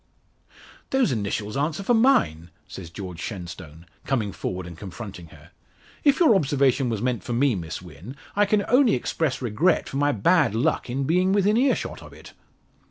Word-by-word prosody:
"Those 265 - +2
initials 105 -2 -3
answer 155 +7 -1
for 240 - +2
mine," 225 - +2 0.2
says 85 -4 -9
George 90 -1 -8
Shenstone, 85 -5 -8 0.2
coming 115 -7 -1
forward 90 -1 -5
and 85 -1 -9
confronting 95 -1 -9
her. - - -17 0.5
"If 285 -2 +4
your 325 -10 +6
observation 140 - +2
was 110 -1 -3
meant 125 -2 -1
for 120 - -4
me, 130 +2 +2
Miss 85 -2 -5
Wynn, 90 - -11 0.2
I 205 0 +3
can 205 0 +1
only 250 -2 +4
express 135 +2 -2
regret 130 - +1
for 135 - -5
my 145 +1 +2
bad 140 - +2
luck 130 +3 0
in 135 +3 -2
being 180 +6 +2
within 205 +1 +3
earshot 260 +3 0
of - - -13
it." - - -14
130 Hz, 170 wpm, -24 LUFS, -, 0.5 s, your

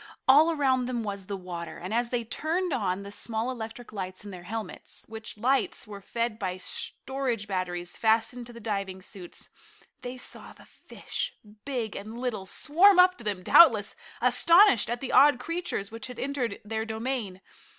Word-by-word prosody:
All 295 +5 +7
around 265 -5 +2
them 245 -2 -2
was 200 -2 -5
the 200 - -3
water, 175 -3 -7
and 185 +4 -6
as 235 +1 +1
they 240 -1 -1
turned 320 +8 -1
on 195 -5 -1
the 200 - -8
small 225 +3 -2
electric 230 -1 -7
lights 185 -1 -6
in 205 - -7
their 180 -2 -10
helmets, 225 0 -6
which 220 -1 -6
lights 260 +5 +1
were 205 -2 -9
fed 230 +2 -2
by 185 -3 -2
storage 250 +3 -3
batteries 175 -2 -3
fastened 225 +2 +1
to 240 - -11
the 235 - -10
diving 195 -4 -3
suits, 185 -3 -9 0.5
they 250 +1 -6
saw 250 - -8
the - - -17
fish, - - -5 0.3
big 245 -6 -3
and 220 +4 -7
little, 225 -7 -3
swarm 355 - +5
up 365 0 +7
to - - -8
them, 200 -4 -3
doubtless 220 - +6 0.3
astonished 340 - +5
at 240 0 -2
the 265 - -4
odd 275 0 +6
creatures 330 - -3
which 225 +1 -6
had 250 -2 -9
entered 260 -6 -2
their 220 +1 -2
domain. 220 -3 -3
225 Hz, 175 wpm, -28 LUFS, 200-260 Hz, 0.5 s, All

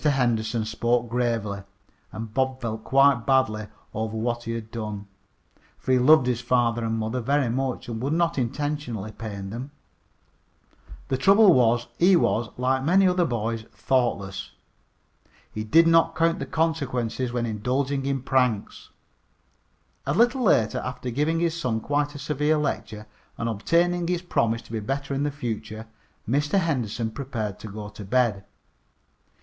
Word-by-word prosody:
Henderson 120 -6 +1
spoke 120 +1 0
gravely, 115 -5 -1 0.5
and 110 -1 -7
Bob 130 0 0
felt 110 -3 -4
quite 135 -2 +4
badly 130 -6 +2 0.3
over 110 0 -3
what 120 +1 -2
he 115 - -3
had 115 -1 -6
done, 105 -3 -5 0.7
for - - -3
he 130 - +5
loved 140 +1 +6
his 125 -1 0
father 120 -1 +1
and 115 0 -1
mother 110 +3 -2
very 140 +1 +1
much, 130 +1 -2
and 115 -2 -5
would 140 +4 -1
not 170 -3 +1
intentionally 125 -4 -3
pain 100 -3 -7
them. 125 +5 -6 1.4
The 130 - +1
trouble 195 +3 +6
was 120 -1 +3
he 185 +2 +6
was, 120 -9 +1
like 130 +1 +1
many 185 +6 +4
other 180 -1 +2
boys, 115 -3 -2
thoughtless. 100 - -1 1.0
He 110 - -3
did 160 +10 +5
not 165 0 +4
count 165 +1 +2
the 140 - -4
consequences 130 -7 -1
when 120 -1 -1
indulging 130 +5 -1
in 135 -2 -1
pranks. 125 -7 0 1.2
A 140 - +1
little 240 +5 +3
later, 120 - +3
after 125 0 -5
giving 150 +6 0
his 165 -1 0
son 125 -9 -1
quite 145 +4 -1
a - - -5
severe 150 +1 0
lecture, 110 -7 -3 0.3
and 115 - -2
obtaining 170 - +1
his 175 0 -1
promise 115 -9 0
to - - -15
be 115 - -2
better 135 +6 -3
in 135 - -1
the 145 - +1
future, 110 -5 -5 0.4
Mr. 145 - +1
Henderson 120 - -1
prepared 110 -6 -4
to - - -8
go 105 0 -7
to 105 0 -10
bed. 105 -2 +1
125 Hz, 155 wpm, -25 LUFS, 110-145 Hz, 1.4 s, loved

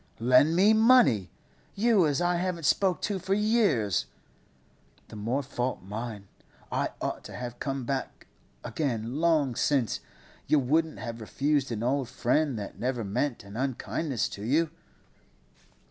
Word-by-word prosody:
'Lend 125 +7 +4
me 200 +5 +5
money? 220 - +5 0.5
You 205 -5 +4
as 145 0 0
I 175 0 +2
haven't 175 -1 -2
spoke 190 +2 +2
to 200 -2 -1
for 190 +2 0
years?' 175 - +2 1.0
'The - - -10
more 115 +7 -1
fault 125 -3 -3
mine. 105 0 -6 0.4
I - - 0
ought - - -3
to - - -9
have 120 -1 -6
come 135 -2 -3
back 135 +1 -4 0.4
again 120 -4 -2
long 155 -5 +2
since; 130 -5 +1 0.5
you 155 - +4
wouldn't 155 +4 +1
have 115 -2 -6
refused 140 +4 0
an 115 -1 -3
old 130 0 0
friend 130 +2 +1
that 100 -2 -7
never 125 -1 -1
meant 120 +5 -2
an 100 +1 -11
unkindness 135 +1 -2
to 100 - -8
you. 150 +7 +1
135 Hz, 145 wpm, -28 LUFS, 115-165 Hz, 1.0 s, me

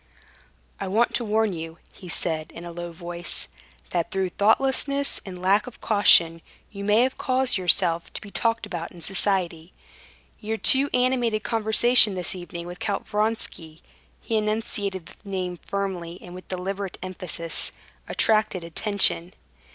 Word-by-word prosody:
"I 195 - -3
want 220 +5 +2
to 240 - +1
warn 220 -1 +1
you," 165 0 -7 0.2
he 180 - -12
said 160 -2 -3
in 170 - -9
a 170 - -7
low 175 0 -6
voice, 175 0 -4 0.4
"that 170 -2 -1
through 190 -1 -1
thoughtlessness 270 +8 +1
and 180 -1 -7
lack 195 +4 +2
of 250 - -10
caution 170 -6 +5 0.3
you 200 -2 -7
may 215 +5 +4
cause 260 0 0
yourself 170 -2 +2
to - - -3
be 200 - -11
talked 230 0 0
about 175 -5 -5
in 175 - -13
society. 180 -2 -1 0.7
Your 220 +1 -3
too 270 +5 +6
animated 245 -4 +1
conversation 225 -1 +4
this 180 -2 -1
evening 175 -2 -7
with 175 0 -8
Count 200 - -2
Vronsky" 210 -7 -3 0.4
(he 225 - -1
enunciated 210 -4 -2
the 200 - -14
name 180 -2 -3
firmly 180 -3 -4
and 175 - -11
with 185 0 -10
deliberate 190 +1 -4
emphasis) 180 -3 -1 0.4
"attracted 215 -5 +2
attention." 180 0 +1
195 Hz, 145 wpm, -25 LUFS, 175-220 Hz, 0.7 s, too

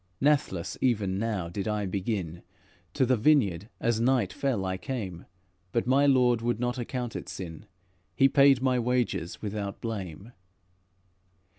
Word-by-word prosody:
Nathless 135 - +1
even 100 -7 +1
now 105 -6 -2
did 95 +4 -4
I 105 -1 -1
begin; 95 -3 -3 0.5
To 135 - +3
the 130 +1 +3
vineyard 110 - +2
as 115 -1 +1
night 120 -7 +2
fell 125 -9 -1
I 95 0 -1
came, 95 - -5 0.4
But 115 - 0
my 135 +3 +4
Lord 125 -4 +4
would 120 -1 -1
not 125 +1 -1
account 120 0 -4
it - - -6
sin; 85 -4 -8 0.5
He 135 - +6
paid 135 -1 +5
my 130 -1 +2
wages 120 -8 -1
without 100 -1 -4
blame. 100 -2 -6
115 Hz, 145 wpm, -28 LUFS, 95-125 Hz, 0.5 s, He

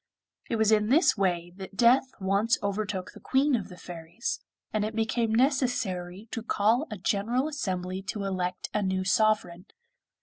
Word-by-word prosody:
It 230 - 0
was 220 -1 +3
in 210 0 +3
this 310 +8 +5
way 175 -3 0
that 195 0 -9
death 245 +3 +5
once 200 +4 +2
overtook 200 -2 -2
the - - -13
Queen 270 +1 +2
of 210 -5 -3
the 180 - -11
Fairies, 170 - -5 0.3
and 215 -1 +1
it 215 +1 -3
became 225 0 0
necessary 225 -7 0
to 230 - -3
call 225 +5 +2
a 215 - -5
general 220 +8 0
assembly 185 -10 -3
to 205 - -3
elect 185 -2 -3
a 210 - +1
new 190 -1 0
sovereign. 200 -3 +1
210 Hz, 165 wpm, -28 LUFS, 185-230 Hz, 0.3 s, this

